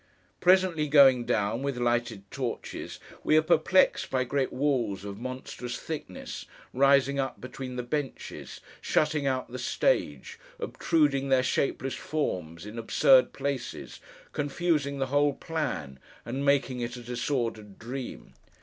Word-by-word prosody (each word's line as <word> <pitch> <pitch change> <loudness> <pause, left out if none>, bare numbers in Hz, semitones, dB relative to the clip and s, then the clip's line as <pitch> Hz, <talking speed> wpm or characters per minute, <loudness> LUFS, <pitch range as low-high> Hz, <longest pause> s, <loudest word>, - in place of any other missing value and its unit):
Presently 180 -4 +4
going 135 -4 +6
down, 105 +4 0
with 140 -2 -2
lighted 120 -4 0
torches, 125 -4 -5 0.2
we 155 - +4
are 155 - +5
perplexed 175 +3 +3
by 130 -1 +1
great 135 +1 -1
walls 120 -9 0
of 100 0 -6
monstrous 125 -1 -5
thickness, 150 - -6 0.3
rising 140 +1 +4
up 135 -1 -2
between 130 0 -7
the 125 - -3
benches, 145 +2 -5 0.2
shutting 150 -2 +1
out 130 -2 -1
the 130 - -5
stage, - - 0 0.2
obtruding 150 - +1
their 130 -1 +4
shapeless 135 +1 0
forms 90 - -3
in 105 +2 -7
absurd 130 +3 +5
places, 140 -3 -4 0.3
confusing 145 -1 0
the 135 - 0
whole 145 0 +4
plan, 85 - -4 0.3
and 130 +4 -3
making 140 -2 +2
it 120 0 -3
a 120 - -9
disordered 120 -4 -3
dream. 120 - -7
135 Hz, 130 wpm, -28 LUFS, 120-145 Hz, 0.3 s, going